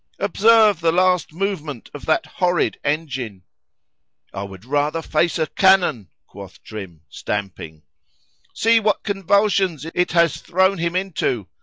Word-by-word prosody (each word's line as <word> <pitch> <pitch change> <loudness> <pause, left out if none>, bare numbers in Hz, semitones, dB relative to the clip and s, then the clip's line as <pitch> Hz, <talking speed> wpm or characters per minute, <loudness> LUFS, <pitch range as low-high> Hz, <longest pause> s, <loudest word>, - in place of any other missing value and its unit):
"Observe 215 -1 +4
the 165 -1 +2
last 180 -1 +2
movement 160 - -4
of 145 - -10
that 155 - +1
horrid 180 -2 -1
engine!"—[I 95 - -7
would 95 0 -9
rather 145 +4 -1
face 170 +3 0
a 160 - +1
cannon, 185 - +2 0.2
quoth 100 -2 -13
Trim, 95 -7 -9
stamping.)—"See 100 - -4
what 210 -1 0
convulsions 195 -5 +1
it 180 -2 0
has 170 -3 +3
thrown 190 +1 +1
him 170 +1 -2
into! 180 - -2
160 Hz, 120 wpm, -20 LUFS, -, 0.2 s, Observe